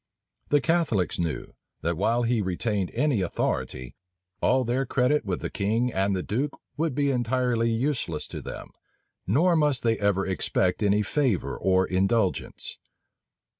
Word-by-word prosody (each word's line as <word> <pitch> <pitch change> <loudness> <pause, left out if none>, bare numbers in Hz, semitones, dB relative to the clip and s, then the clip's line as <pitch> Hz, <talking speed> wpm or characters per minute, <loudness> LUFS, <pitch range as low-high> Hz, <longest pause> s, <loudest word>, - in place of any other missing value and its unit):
The 145 -1 +4
Catholics 145 - +1
knew, 85 -3 -3 0.3
that 85 +2 0
while 115 +7 +1
he 115 -1 +1
retained 95 +1 -1
any 130 -4 +2
authority, 65 -7 -2 0.5
all 130 0 +3
their 125 +3 0
credit 130 +3 +1
with 95 -3 -2
the - - -3
king 115 +4 0
and 95 +1 +1
the 90 - -2
duke 135 +7 -2 0.2
would 155 -3 -1
be 140 -1 +2
entirely 120 -1 +1
useless 125 +4 -1
to - - -6
them, - - -8 0.6
nor 165 - +3
must 150 -5 +2
they 115 -1 +2
ever 100 -1 +1
expect 95 0 0
any 105 0 +3
favor 125 -3 0
or 95 0 +2
indulgence. 95 +1 0
115 Hz, 145 wpm, -26 LUFS, 95-130 Hz, 0.6 s, The